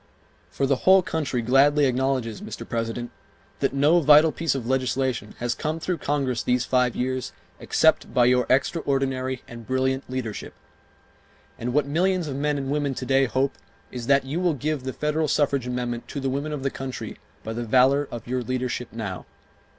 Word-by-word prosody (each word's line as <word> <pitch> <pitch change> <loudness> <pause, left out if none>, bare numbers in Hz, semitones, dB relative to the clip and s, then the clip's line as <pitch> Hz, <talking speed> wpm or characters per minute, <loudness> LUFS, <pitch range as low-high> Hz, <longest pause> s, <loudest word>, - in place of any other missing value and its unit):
For 140 - -1
the 135 -1 +2
whole 190 +4 +5
country 150 -8 -2
gladly 140 +4 +4
acknowledges, 130 - 0
Mr. 210 - -7
President, 115 +1 -3 0.5
that - - +1
no 145 +5 +4
vital 155 +1 +6
piece 165 -3 -1
of 130 -4 -4
legislation 130 -3 -1
has 120 0 -1
come 155 +7 -3
through 175 +1 -2
Congress 135 -5 -1
these 125 0 +1
five 125 -2 +2
years 130 0 -2 0.3
except - - +2
by 125 - +4
your 125 0 +3
extraordinary 130 -2 0
and 115 -1 -10
brilliant 130 +1 0
leadership. 125 -5 -5 1.0
And 120 +2 -2
what 145 +2 +2
millions 175 +4 +1
of 140 - -4
men 145 +1 0
and 135 -1 -3
women 145 -2 -1
to 130 - -5
day 135 +1 +3
hope 130 +2 0 0.4
is 120 -2 -6
that 140 -1 +4
you 145 +6 -2
will 175 -4 +1
give 145 -1 -3
the 130 - -2
federal 150 +1 0
suffrage 140 -4 +1
amendment 120 -1 -3
to 140 - -5
the 135 -1 -1
women 140 +3 -2
of 145 -3 -4
the 135 - 0
country 130 -5 -6 0.2
by 110 - -4
the 120 +1 -3
valor 130 +4 +3
of 120 - -8
your 125 +1 -1
leadership 125 0 -3
now. 100 -5 -6
130 Hz, 180 wpm, -24 LUFS, 125-145 Hz, 1.0 s, vital